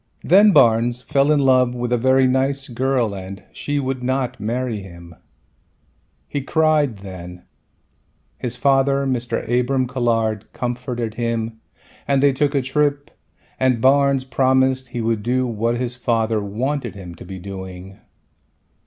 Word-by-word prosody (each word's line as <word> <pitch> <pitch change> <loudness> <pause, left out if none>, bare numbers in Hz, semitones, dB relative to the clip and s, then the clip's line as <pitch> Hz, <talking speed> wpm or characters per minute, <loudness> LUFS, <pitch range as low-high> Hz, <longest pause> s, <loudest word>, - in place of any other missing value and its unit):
Then 200 +5 +6
Barnes 120 - +4
fell 140 +3 +1
in 150 -2 +3
love 130 -2 +3
with 120 0 -2
a - - +3
very 130 +2 +4
nice 135 +2 +1
girl 125 -3 0
and 95 +1 -8
she 145 0 -3
would 130 -2 -3
not 130 0 -2
marry 120 +1 -2
him. 85 -3 -12 1.1
He 145 - -3
cried 150 -4 +1
then, 90 -1 -9 1.0
his 125 -1 -3
father 135 +1 +2
Mr. 125 -3 -2
Abram 125 +2 +1
Colhard 115 -4 -1
comforted 120 -2 -3
him 115 -1 -3 0.5
and 140 -1 +2
they 140 -1 +5
took 145 +2 0
a 135 - +1
trip 145 +1 0 0.5
and 130 -2 +2
Barnes 140 +1 +3
promised 130 0 +1
he 120 -1 -5
would 115 -1 0
do 125 +4 0
what 115 0 -1
his 125 0 -3
father 115 -2 0
wanted 120 +2 -3
him 90 -3 -9
to 85 - -12
be 95 +1 -8
doing. 95 0 -9
125 Hz, 145 wpm, -20 LUFS, 110-135 Hz, 1.1 s, Then